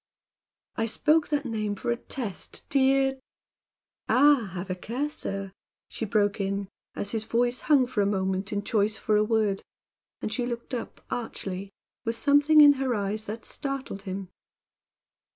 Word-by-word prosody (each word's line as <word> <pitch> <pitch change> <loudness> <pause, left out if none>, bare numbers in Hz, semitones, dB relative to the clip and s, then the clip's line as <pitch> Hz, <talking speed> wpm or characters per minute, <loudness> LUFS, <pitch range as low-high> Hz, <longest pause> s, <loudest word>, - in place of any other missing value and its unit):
"I 225 - +1
spoke 305 +7 +3
that 295 -1 -1
name 215 -3 -2
for 235 - -2
a - - +2
test, 235 -4 -6
dear 270 0 +3 0.5
" - - -44
"Ah! 270 -5 +5
Have 185 +1 -4
a - - -1
care, 250 +10 -3
sir!" 195 -7 -4 0.4
she 225 - -4
broke 205 -1 +1
in, 195 0 -2 0.3
as 200 - -2
his 225 -2 -1
voice 240 +2 +1
hung 285 -4 +4
for 240 -4 -1
a 200 - +2
moment 190 0 -1
in 205 -1 -1
choice 210 0 +1
for 215 - +1
a 210 - +4
word, 215 -3 +1 0.6
and 215 - -3
she 245 0 -1
looked 235 +1 -5
up 240 - -5
archly, 195 -4 -4 0.3
with 230 -1 -1
something 290 +4 +5
in 290 -1 +9
her 255 -3 +1
eyes 210 +1 -2
that 220 +2 -6
startled 275 -7 -4
him. 190 -1 -5
225 Hz, 165 wpm, -27 LUFS, 200-265 Hz, 0.6 s, in